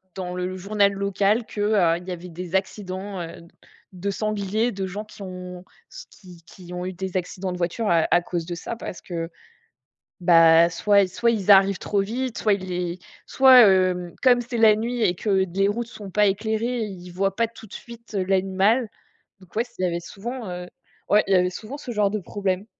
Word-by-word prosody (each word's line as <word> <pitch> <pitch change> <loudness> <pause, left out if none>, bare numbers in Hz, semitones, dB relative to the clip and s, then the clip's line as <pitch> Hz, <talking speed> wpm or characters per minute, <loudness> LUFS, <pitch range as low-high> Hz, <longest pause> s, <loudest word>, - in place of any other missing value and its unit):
dans 180 -1 -5
le 180 +1 -3
journal 200 +1 +2
local 200 +3 +1
que, 210 - -6
heu, 195 -6 +3
il 180 +1 -12
y - - -4
avait 180 0 -7
des 175 +1 -6
accidents, 190 0 -3
heu, 165 0 -8
d 170 - -16 0.5
de 190 +2 -3
sanglier, 215 +2 -1
de 195 -1 -3
gens 200 +3 -6
qui 210 - -15
ont 180 -1 -8 0.3
se - - -10
qui 180 -4 -16
qui 180 0 -12
ont 180 0 -4
eu 185 - -3
des 190 0 -6
accidents 185 +1 -3
de - - -5
voiture 180 +5 -1
à 165 -2 +3
à 175 - +5
cause 175 -1 -4
de 175 - -5
ça, 170 +7 -5
parce 225 - -8
que, 165 -2 -5 0.9
bah, 165 -1 +6
soit 200 +3 +3
soit 235 +5 +1
ils 210 -3 -3
arrivent 195 0 +5
trop 200 -1 0
vite, 240 +4 -3
soit 215 - +2
ils 195 -1 -3
les 180 -1 -3 0.3
soit, 260 -4 +7
heu, 185 -2 +2
comme 245 -3 +5
c'est 240 0 -5
la 220 -2 +6
nuit 235 +3 -3
et 180 -5 +2
que 205 +4 -2 0.2
les 195 +2 +2
routes 230 +3 -2
sont 205 -4 -10
pas 210 +1 +3
éclairées, 220 +4 -1
ils 180 -3 -9
voient 195 +2 -1
pas 230 +2 +1
tout 225 0 -14
de 210 - -15
suite, 235 -2 -11
heu, 195 - 0
l'animal, 195 +5 +2 0.5
donc 185 -2 -20
ouais, 230 - +2
ç 245 - -19
il - - -1
y - - +2
avait 170 -1 -2
souvent, 225 +7 -7
heu, 180 0 -6 0.4
ouais, 210 +1 +5
il 195 - +2
y - - +6
avait 180 0 +3
souvent 220 +9 -8
ce 255 - -7
genre 210 -3 +1
de 215 - -2
problème. 195 0 -3
195 Hz, 220 wpm, -23 LUFS, 180-215 Hz, 0.9 s, soit